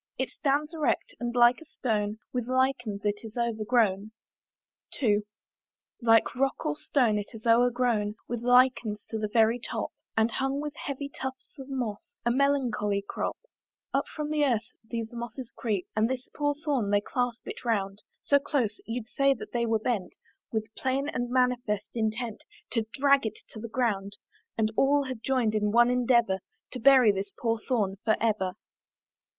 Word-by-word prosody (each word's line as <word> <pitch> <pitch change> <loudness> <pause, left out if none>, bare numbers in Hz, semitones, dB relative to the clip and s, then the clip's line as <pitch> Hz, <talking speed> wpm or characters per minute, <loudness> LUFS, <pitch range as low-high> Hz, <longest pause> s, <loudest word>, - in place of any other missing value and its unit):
It 260 -1 -2
stands 295 +3 0
erect, 310 -2 0
and 240 0 -3
like 240 +3 +5
a - - -12
stone 215 -8 -1 0.2
With 245 -2 -2
lichens 255 -5 0
it 205 0 +1
is 225 +1 -9
overgrown. 220 -3 +1 0.9
II. 210 -6 +3 0.8
Like 225 -1 +4
rock 270 +2 0
or 150 - 0
stone, 225 - +2
it 205 +3 -7
is 220 - -11
o'ergrown 235 -3 +3
With 240 -1 -3
lichens 245 -4 +3
to 220 - -2
the 215 - -1
very 225 +1 +4
top, - - -4 0.3
And 225 +1 +3
hung 270 +3 -1
with 295 0 -4
heavy 280 0 -4
tufts 265 -1 -7
of 270 0 -8
moss, 240 -6 -2 0.3
A 240 - +3
melancholy 240 -7 +1
crop: - - -3 0.6
Up - - +2
from 300 -1 -4
the 300 -1 +2
earth 240 -4 +1
these 230 0 -5
mosses 235 +1 -6
creep, 205 -6 -1
And 215 +2 +2
this 260 -1 -3
poor 290 -1 +1
thorn 285 -8 -1
they 205 0 +3
clasp 245 +2 -2
it - - -7
round 200 -4 -1 0.2
So 285 - +4
close, 260 -7 -1
you'd 230 0 -3
say 275 +1 +2
that - - -9
they 235 -1 0
were 225 0 +3
bent 215 -4 -2 0.4
With 220 0 -3
plain 270 +2 -1
and 245 0 -2
manifest 245 -5 +1
intent, 220 0 -2 0.3
To 225 -2 -1
drag 280 -3 +3
it 215 - -6
to 220 - -9
the 230 +1 -6
ground; 205 -5 -1 0.4
And 220 -1 +1
all 285 +3 +4
had 260 -4 -6
joined 245 -4 +1
in 210 -1 +1
one 240 +2 +5
endeavour 235 -5 +3 0.3
To 255 - -5
bury 255 -3 +7
this 200 0 -3
poor 230 -1 0
thorn 210 -5 -1
for 220 -2 +3
ever. 210 -5 +1
235 Hz, 170 wpm, -28 LUFS, 215-260 Hz, 0.9 s, bury